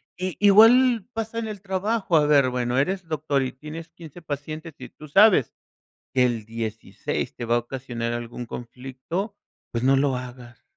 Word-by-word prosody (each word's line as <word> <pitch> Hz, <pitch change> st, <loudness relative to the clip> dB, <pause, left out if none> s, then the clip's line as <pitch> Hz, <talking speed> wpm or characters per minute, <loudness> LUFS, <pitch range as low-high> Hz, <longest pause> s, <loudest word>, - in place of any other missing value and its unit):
Y 185 Hz, -2 st, -4 dB
igual 225 Hz, +3 st, +6 dB
pasa 225 Hz, +1 st, -3 dB
en 225 Hz, -, -3 dB
el 210 Hz, -3 st, -7 dB
trabajo, 195 Hz, 0 st, -1 dB
a 150 Hz, -2 st, +4 dB
ver, 140 Hz, -3 st, +5 dB
bueno, 125 Hz, 0 st, -1 dB
eres 185 Hz, +6 st, 0 dB
doctor 150 Hz, -3 st, 0 dB
y 130 Hz, -1 st, -3 dB
tienes 155 Hz, +4 st, -9 dB
15, 170 Hz, 0 st, -12 dB
pacientes, 155 Hz, +1 st, -6 dB
y -, -, -10 dB
tú 155 Hz, -, -13 dB
sabes, 185 Hz, -, +5 dB, 0.6 s
que 130 Hz, -, +5 dB
el 115 Hz, -3 st, -2 dB
16, 115 Hz, -1 st, -4 dB
te 120 Hz, -, -5 dB
va 120 Hz, +1 st, +2 dB
a -, -, +2 dB
ocasionar 120 Hz, -1 st, -5 dB
algún 120 Hz, 0 st, -6 dB
conflicto, 130 Hz, -, -6 dB, 0.4 s
pues, 115 Hz, 0 st, -2 dB
no 135 Hz, +1 st, +5 dB
lo 135 Hz, -1 st, +2 dB
hagas. 125 Hz, -2 st, -10 dB
145 Hz, 175 wpm, -24 LUFS, 125-185 Hz, 0.6 s, igual